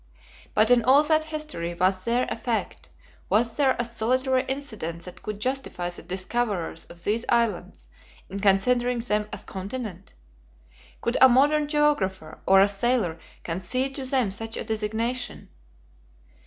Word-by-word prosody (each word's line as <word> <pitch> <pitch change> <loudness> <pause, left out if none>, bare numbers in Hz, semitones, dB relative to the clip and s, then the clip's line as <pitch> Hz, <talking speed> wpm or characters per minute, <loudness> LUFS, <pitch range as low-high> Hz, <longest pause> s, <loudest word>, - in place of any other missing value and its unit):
But 215 +3 +4
in 245 -2 +5
all 270 +5 +6
that 310 0 +3
history 305 - -4
was 185 +1 +1
there 240 +2 +2
a - - -1
fact, - - -3 0.4
was 230 +2 +2
there 275 -3 +3
a 240 - -1
solitary 255 +3 +1
incident 220 - -4
that 180 - -9
could 210 -1 -5
justify 250 -8 -2
the 175 - -8
discoverers 185 0 -2
of 170 0 -8
these 220 +3 0
islands 215 - 0 0.4
in 195 - -6
considering 240 +5 +2
them 210 -3 -1
as - - -6
"a - - -25
continent." 195 -1 -6 0.9
Could 235 - 0
a 260 - +10
modern 295 +4 +4
geographer 205 - 0
or 195 0 +7
a 195 - +6
sailor 200 -5 0 0.2
concede 220 +11 -2
to 270 - -4
them 255 -6 +1
such 225 +3 -6
a - - -3
designation. 220 +3 -3
230 Hz, 150 wpm, -25 LUFS, 190-255 Hz, 0.9 s, a